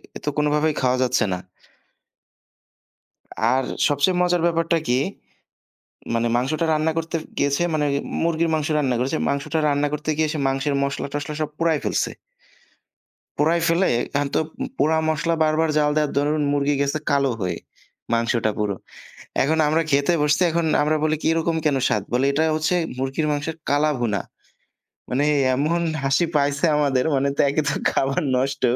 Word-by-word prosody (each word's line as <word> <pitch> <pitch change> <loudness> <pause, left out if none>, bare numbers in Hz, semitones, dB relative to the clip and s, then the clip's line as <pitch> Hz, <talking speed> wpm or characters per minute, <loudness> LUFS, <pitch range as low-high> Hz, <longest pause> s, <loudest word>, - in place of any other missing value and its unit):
এ - - -3
তো - - +1
কোনভাবেই 150 +1 +2
খাওয়া 130 0 +2
যাচ্ছে 125 -2 +1
না। - - -2 2.2
আর 135 +1 +1 0.2
সবচেয়ে 145 +6 +1
মজার 175 -1 +2
ব্যাপারটা 165 0 +1
কী? 125 +1 +2 1.1
মানে 115 0 +1
মাংসটা 140 +7 0
রান্না 155 +1 +1
করতে 165 +1 -3 0.2
গিয়েছে 140 +2 +1
মানে 150 -1 +1 0.4
মুরগির 165 0 +1
মাংস 155 -1 0
রান্না 135 -4 +1
করেছে। 135 +5 -1
মাংসটা 140 +3 -1
রান্না 145 0 +1
করতে 150 +1 -3
গিয়ে 155 -1 +1
সে 155 - -3
মাংসের 135 +2 0
মশলা 140 0 -2
টশলা 145 +1 -4
সব 155 - -1
পোড়ায় 165 -2 +1
ফেলছে। - - 0 1.3
পোড়ায় 165 +3 +2
ফেলে 170 +3 +2 0.3
এখন 145 0 +1
তো - - +4 0.4
পোড়া 160 +2 +2
মশলা 160 +1 0
বারবার 155 +1 +1
জ্বাল 150 -1 +3
দেওয়ার 150 -2 +1
দরুন 150 +1 +1
মুরগি 145 0 +1
গেছে 140 +2 0
কালো 140 -2 +2
হয়ে। 90 -1 -2 0.6
মাংসটা 115 -1 +1
পুরো। 105 -2 -1 0.7
এখন 155 +4 +1
আমরা 155 +2 +2
খেতে 140 +4 +3
বসছি, 150 +4 +2
এখন 170 0 0 0.2
আমরা 150 +1 +2
বলি 155 0 +2 0.2
এরকম 165 0 0
কেন 145 -3 +2
স্বাদ? 105 - +1
বলে 125 +2 +2
এটা 150 +3 +1
হচ্ছে 155 +3 0 0.2
মুরগির 135 +4 -1
মাংসের 145 +2 -3
কালা 145 +2 +2
ভুনা। 110 -4 0 0.9
মানে 135 +3 0 0.3
এমন 155 +6 0 0.2
হাসি 135 +5 +2
পাইছে 140 +2 +1
আমাদের। 140 -4 +1
মানে 140 +1 +1
তো - - 0
একেতো 145 -1 0 0.2
খাবার 135 0 0
নষ্ট 135 +1 -1
145 Hz, 155 wpm, -22 LUFS, 135-155 Hz, 2.2 s, তো